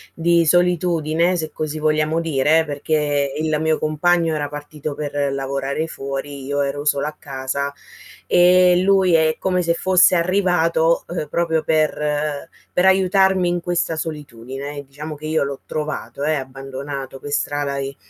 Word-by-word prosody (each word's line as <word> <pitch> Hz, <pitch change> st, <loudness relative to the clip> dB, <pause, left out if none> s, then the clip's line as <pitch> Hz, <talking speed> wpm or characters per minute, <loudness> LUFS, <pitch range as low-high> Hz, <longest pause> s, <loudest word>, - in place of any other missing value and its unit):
di 170 Hz, 0 st, +3 dB
solitudine, 175 Hz, 0 st, +2 dB
se 155 Hz, -2 st, -4 dB
così 155 Hz, 0 st, -4 dB
vogliamo 155 Hz, +1 st, +1 dB
dire, 160 Hz, 0 st, +2 dB
perché 145 Hz, -1 st, -1 dB
il 155 Hz, 0 st, 0 dB
mio 160 Hz, 0 st, +1 dB
compagno 165 Hz, +2 st, +1 dB
era 145 Hz, -1 st, -2 dB
partito 145 Hz, 0 st, -6 dB
per 145 Hz, 0 st, -5 dB, 0.2 s
lavorare 140 Hz, +3 st, -2 dB
fuori, 140 Hz, -1 st, -6 dB
io 145 Hz, +1 st, -1 dB
ero 140 Hz, +1 st, -2 dB
sola 145 Hz, -1 st, +1 dB
a 155 Hz, -, -6 dB
casa, 140 Hz, +1 st, -4 dB, 0.5 s
ehm, 180 Hz, 0 st, +5 dB
lui 190 Hz, -2 st, +3 dB
è 160 Hz, -1 st, +2 dB
come 185 Hz, -1 st, 0 dB
se 170 Hz, -, +2 dB
fosse 185 Hz, +2 st, +4 dB
arrivato, 170 Hz, -2 st, +2 dB
ehm, 170 Hz, -3 st, -3 dB
proprio, 165 Hz, -2 st, 0 dB
per 150 Hz, -1 st, 0 dB, 0.3 s
per 180 Hz, -, +2 dB
aiutarmi 190 Hz, -1 st, +3 dB
in 175 Hz, -, 0 dB
questa 170 Hz, -1 st, -1 dB
solitudine. 145 Hz, -2 st, -6 dB
Diciamo 150 Hz, +3 st, -8 dB
che 150 Hz, -, -10 dB
io 160 Hz, -1 st, +1 dB
l'ho 140 Hz, -1 st, -5 dB
trovato, 150 Hz, -2 st, -4 dB
eh, 155 Hz, +1 st, +2 dB
abbandonato 135 Hz, 0 st, -6 dB
per 145 Hz, +2 st, -8 dB
strada 145 Hz, -1 st, -1 dB
e 135 Hz, 0 st, -4 dB
155 Hz, 150 wpm, -20 LUFS, 140-170 Hz, 0.5 s, ehm